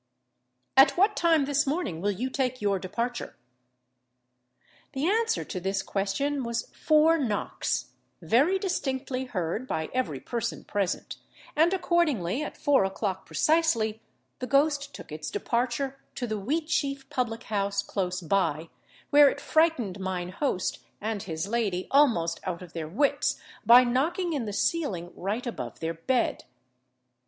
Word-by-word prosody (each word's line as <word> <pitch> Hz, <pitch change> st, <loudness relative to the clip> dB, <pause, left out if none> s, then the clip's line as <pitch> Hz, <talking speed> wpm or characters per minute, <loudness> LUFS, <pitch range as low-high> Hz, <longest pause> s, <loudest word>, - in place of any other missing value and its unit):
] -, -, -51 dB, 0.3 s
"At 270 Hz, +5 st, +7 dB
what 405 Hz, +3 st, +4 dB
time 325 Hz, -4 st, +3 dB
this 285 Hz, +1 st, +1 dB
morning 270 Hz, -, -2 dB
will 205 Hz, -, +1 dB
you 235 Hz, +7 st, -2 dB
take 255 Hz, -2 st, -1 dB
your 200 Hz, -2 st, +1 dB
departure?" 235 Hz, +6 st, -4 dB, 1.6 s
The 270 Hz, +2 st, -1 dB
answer 450 Hz, +4 st, +1 dB
to 185 Hz, -, -4 dB
this 195 Hz, +2 st, -1 dB
question 270 Hz, +9 st, -1 dB
was 235 Hz, -1 st, -3 dB
four 315 Hz, +1 st, +4 dB
knocks, 220 Hz, -7 st, -2 dB, 0.3 s
very 290 Hz, +12 st, +3 dB
distinctly 270 Hz, -8 st, -2 dB
heard 200 Hz, +2 st, -3 dB
by 160 Hz, -8 st, -3 dB
every 245 Hz, -, -1 dB
person 235 Hz, -, -3 dB
present; 195 Hz, -3 st, -2 dB, 0.4 s
and 325 Hz, +3 st, +4 dB
accordingly, 305 Hz, -, +1 dB
at 300 Hz, -, -5 dB
four 285 Hz, -7 st, +3 dB
o'clock 190 Hz, 0 st, -3 dB
precisely 235 Hz, -10 st, +2 dB, 0.4 s
the 255 Hz, -, -4 dB
ghost 285 Hz, 0 st, +2 dB
took -, -, -11 dB
its 155 Hz, +1 st, -5 dB
departure 255 Hz, +3 st, -1 dB, 0.2 s
to 250 Hz, -, -2 dB
the 215 Hz, -2 st, -3 dB
Wheatsheaf 285 Hz, +1 st, -1 dB
public 240 Hz, -5 st, -2 dB
house 200 Hz, -1 st, -1 dB
close 185 Hz, -2 st, -2 dB
by, 165 Hz, -3 st, 0 dB, 0.4 s
where 290 Hz, -1 st, +8 dB
it 285 Hz, -, -5 dB
frightened 290 Hz, -, +1 dB
mine 185 Hz, -2 st, -3 dB
host 185 Hz, -2 st, -1 dB, 0.2 s
and 215 Hz, -1 st, -3 dB
his 160 Hz, 0 st, -4 dB
lady 205 Hz, -5 st, -1 dB
almost 240 Hz, -, +3 dB
out 180 Hz, -1 st, -4 dB
of 175 Hz, -, -13 dB
their 160 Hz, -2 st, -4 dB
wits, 265 Hz, -, +1 dB, 0.3 s
by 245 Hz, +2 st, +9 dB
knocking 320 Hz, +9 st, 0 dB
in 270 Hz, -6 st, -1 dB
the 210 Hz, -, -4 dB
ceiling 200 Hz, -, -1 dB
right 210 Hz, +7 st, -3 dB
above 240 Hz, -, -5 dB
their 165 Hz, 0 st, -2 dB
bed. 240 Hz, +10 st, 0 dB
240 Hz, 145 wpm, -27 LUFS, 195-290 Hz, 1.6 s, by